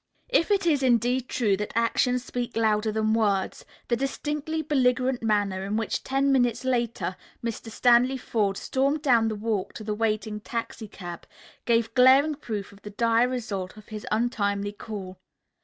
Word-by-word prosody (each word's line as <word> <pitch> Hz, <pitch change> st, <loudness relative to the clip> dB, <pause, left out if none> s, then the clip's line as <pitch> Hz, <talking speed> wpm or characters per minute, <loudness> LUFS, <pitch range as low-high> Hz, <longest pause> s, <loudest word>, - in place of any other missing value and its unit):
If 460 Hz, -8 st, +2 dB
it 400 Hz, -2 st, +2 dB
is 300 Hz, -5 st, +3 dB
indeed 250 Hz, 0 st, +2 dB
true 215 Hz, -5 st, +1 dB
that 210 Hz, +1 st, -4 dB
actions 245 Hz, +2 st, +1 dB
speak 245 Hz, -2 st, -4 dB
louder 215 Hz, -1 st, +2 dB
than 220 Hz, 0 st, +1 dB
words, 205 Hz, -4 st, 0 dB, 0.2 s
the 240 Hz, -, +2 dB
distinctly 295 Hz, +4 st, -3 dB
belligerent 260 Hz, -3 st, +1 dB
manner 205 Hz, -4 st, 0 dB
in 200 Hz, +2 st, -2 dB
which, 225 Hz, -, -2 dB
ten 275 Hz, +1 st, +1 dB
minutes 245 Hz, -1 st, +2 dB
later, 235 Hz, -7 st, -1 dB, 0.3 s
Mr. 230 Hz, 0 st, -4 dB
Stanley 245 Hz, +3 st, +4 dB
Forde 205 Hz, -5 st, -1 dB
stormed 275 Hz, +3 st, 0 dB
down 235 Hz, -6 st, +4 dB
the 220 Hz, -, -2 dB
walk 210 Hz, -2 st, -2 dB
to 220 Hz, -, -8 dB
the 210 Hz, 0 st, -2 dB
waiting 215 Hz, 0 st, -1 dB
taxicab, 210 Hz, -6 st, -6 dB, 0.4 s
gave 230 Hz, -1 st, +1 dB
glaring 270 Hz, +4 st, +6 dB
proof 220 Hz, -8 st, -5 dB
of 200 Hz, 0 st, -17 dB
the 210 Hz, -, -8 dB
dire 230 Hz, +3 st, +2 dB
result 210 Hz, -7 st, -4 dB
of 215 Hz, -, -14 dB
his 215 Hz, -1 st, -7 dB
untimely 205 Hz, -3 st, 0 dB
call. 200 Hz, -3 st, -8 dB
230 Hz, 160 wpm, -26 LUFS, 210-255 Hz, 0.4 s, glaring